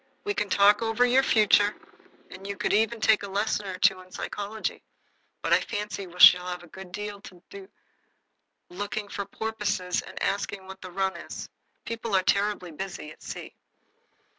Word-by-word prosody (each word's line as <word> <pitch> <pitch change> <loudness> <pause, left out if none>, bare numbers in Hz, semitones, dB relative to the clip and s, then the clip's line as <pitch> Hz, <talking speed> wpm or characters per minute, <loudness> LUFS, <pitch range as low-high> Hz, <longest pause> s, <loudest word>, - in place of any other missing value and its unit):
We 410 - -1
can 210 - -2
talk 205 +2 +5
over 225 +2 +2
your 250 +2 +5
future, 210 -4 +4 0.6
and 190 +1 -9
you 200 0 -4
could - - 0
even 220 +2 +2
take 215 0 +4
a 200 - -6
lesson 205 +1 -1
or 185 -1 -5
two 195 -1 +3
in 185 0 -17
psychology. 210 +3 -4 0.6
But - - +2
I - - +6
fancy 205 -2 -4
we 175 0 -13
shall 180 0 +9
have 180 -1 -5
a - - -13
good 190 +2 -11
deal 210 +1 -6
to 180 -3 -13
do 390 -1 -10 1.0
looking 205 +3 -4
for 200 - -4
porpoises 200 -4 -2
and - - -9
asking 200 -1 -2
what 190 0 -11
the 185 - -8
run 190 +1 -1
is. 170 - -7 0.4
People 230 -2 -3
are 190 - +3
terribly 200 -3 +1
busy 170 -2 -6
at - - -16
sea." - - -8
200 Hz, 180 wpm, -27 LUFS, 190-215 Hz, 1.0 s, shall